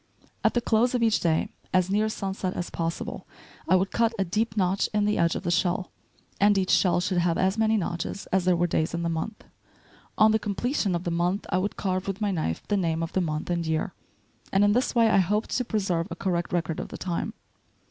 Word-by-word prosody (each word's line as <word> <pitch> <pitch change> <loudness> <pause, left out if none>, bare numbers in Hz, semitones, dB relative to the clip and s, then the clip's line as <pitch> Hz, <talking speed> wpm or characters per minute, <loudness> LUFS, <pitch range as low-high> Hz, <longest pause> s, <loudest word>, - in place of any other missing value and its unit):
At - - +2
the 240 - +2
close 235 +3 +2
of 240 - +1
each 225 -2 +3
day, 160 -2 +1 0.2
as 185 0 +2
near 215 +2 +2
sunset 190 -3 -3
as 175 - -4
possible, 165 0 -4 0.4
I 185 - +6
would 190 +1 +1
cut 230 0 +2
a 195 - +1
deep 215 +4 -1
notch 190 0 +1
in 210 -1 +3
the 210 - +1
edge 170 0 +2
of - - -4
the 170 - -1
shell, 180 +1 0 0.5
and 205 0 +4
each 185 -1 +1
shell 175 -2 +4
should 180 0 0
have 170 -1 +1
as 190 +1 +2
many 220 0 +2
notches 175 +1 -3
as 190 -2 +2
there 180 -1 +4
were 175 +1 +2
days 165 -1 0
in 170 - -2
the 170 - 0
month. 165 +7 -4 0.7
On 215 0 +6
the 220 - +2
completion 205 -1 -1
of 170 - -3
the 175 - -2
month 175 +4 0
I 185 - +2
would 200 +2 -2
carve 185 -1 -1
with 195 0 -3
my 210 -2 0
knife 155 - -2
the 205 - +1
name 165 -3 0
of 165 - -5
the 190 - +1
month 155 0 -2
and 170 -1 0
year; 160 -1 -1 0.6
and 195 +1 +4
in 205 - +5
this 250 +3 0
way 230 -1 +5
I 215 - +4
hoped 210 +4 0
to 250 - +1
preserve 190 -7 -1
a 170 - -5
correct 175 -1 -2
record 165 -2 -1
of - - -4
the - - -8
time. 175 -2 -3
185 Hz, 240 wpm, -26 LUFS, 170-210 Hz, 0.7 s, I